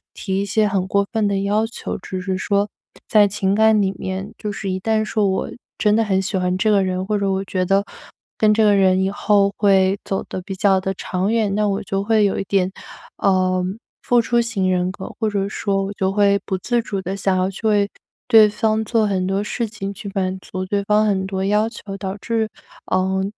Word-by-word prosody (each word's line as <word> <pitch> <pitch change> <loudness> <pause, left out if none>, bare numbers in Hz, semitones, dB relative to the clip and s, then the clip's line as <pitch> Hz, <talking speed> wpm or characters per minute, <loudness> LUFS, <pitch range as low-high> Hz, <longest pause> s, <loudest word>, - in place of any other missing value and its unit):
提 190 -1 -2
一 - - -1
些 210 +2 +2
很 195 -2 -1
过 200 +1 +1
分 220 -2 +1
的 200 -1 0
要 210 +3 +1
求。 230 - -6
只 185 0 -6
是 185 +1 -2
说 200 +2 0 0.4
在 210 -2 +5
情 195 0 -1
感 220 0 +4
里 195 -2 +1
面 190 +1 -4
就 210 - -3
是 195 -1 -4
一 185 - -2
旦 215 +2 0
说 210 -2 +1
我 190 - -2 0.3
真 210 -1 +3
的 225 - +3
很 195 -3 +1
喜 195 +1 -3
欢 180 0 0
这 215 +3 +2
个 200 -2 +4
人， 185 0 -2
或 210 +1 0
者 200 -1 0
我 190 0 -1
觉 185 -1 -1
得 195 +2 +2 0.6
跟 215 -1 +4
这 220 - +3
个 205 - +5
人 190 -1 +3
以 195 - 0
后 200 -1 +2
会 195 -1 +3
走 195 - -2
得 185 - -5
比 190 +1 -6
较 190 -1 +3
地 190 - -2
长 185 +3 -2
远， 215 -4 +1
那 210 0 +1
我 200 +2 -2
就 195 0 -2
会 215 0 +3
有 200 - 0
一 - - -1
点， 190 -1 +1 0.5
呃， 185 -1 +2 0.4
付 245 - +3
出 235 +1 +2
型 200 -6 -1
人 180 0 0
格， 190 - -8
或 220 -1 +1
者 200 -1 -1
说 200 -1 -1
我 200 - -5
就 190 -1 -1
会 200 0 +3
不 190 - -2
自 240 +5 0
主 200 -4 -4
地 190 +2 -3
想 195 -1 0
要 185 - +1
去 215 +3 -4
为 205 -2 +3 0.4
对 215 -2 +7
方 220 +1 0
做 220 0 +1
很 190 -2 0
多 195 +1 0
事 235 +2 -2
情， 200 -2 -6
去 200 - -8
满 190 0 -1
足 185 0 -6
对 200 +1 -1
方 210 +1 +3
很 190 -2 0
多 190 0 -2
要 210 +2 +2
求， 205 -3 -8
导 190 0 -5
致 220 +1 -1 0.4
呃， 190 +1 0
200 Hz, 245 characters per minute, -20 LUFS, 190-210 Hz, 0.6 s, 对